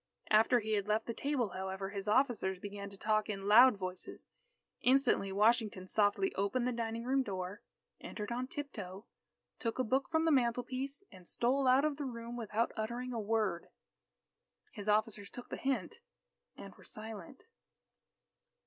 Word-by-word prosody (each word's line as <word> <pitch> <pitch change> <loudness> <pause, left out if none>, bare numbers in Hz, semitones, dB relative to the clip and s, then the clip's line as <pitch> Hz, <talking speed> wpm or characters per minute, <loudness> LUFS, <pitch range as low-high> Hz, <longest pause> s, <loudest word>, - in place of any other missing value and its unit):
After 225 +3 +5
he 220 +1 -4
had 205 -1 0
left 215 +1 +1
the 230 - -3
table, 270 -4 -1
however, 190 +1 -4
his 200 0 -5
officers 215 -5 +2
began 200 +1 -7
to 200 - -12
talk 215 +1 +1
in 195 -1 -4
loud 235 +2 +8
voices. 185 -1 -6 0.5
Instantly, 255 -6 +3
Washington 210 -2 +2
softly 210 - +2
opened 200 +6 0
the - - +1
dining 230 -1 -3
room 265 +2 +2
door, 190 -3 -4 0.4
entered 210 +1 -6
on 250 +2 -2
tip 290 -1 -5
toe, 195 +1 -7 0.5
took 230 -2 -2
a 255 - +2
book 260 +3 0
from 320 0 +2
the 325 - +4
mantelpiece, 255 +3 0
and 180 -2 -13
stole 260 +3 +1
out 260 +3 +5
of 300 -2 0
the 290 - -3
room 235 -1 -6
without 230 0 -1
uttering 240 +3 -3
a 230 - -2
word. 210 -5 0 1.0
His 210 -5 -5
officers 210 -1 +1
took 245 - -10
the - - -4
hint, 260 -9 -2 0.6
and 195 - -9
were - - -18
silent. 220 +6 -8
225 Hz, 165 wpm, -34 LUFS, 200-255 Hz, 1.0 s, loud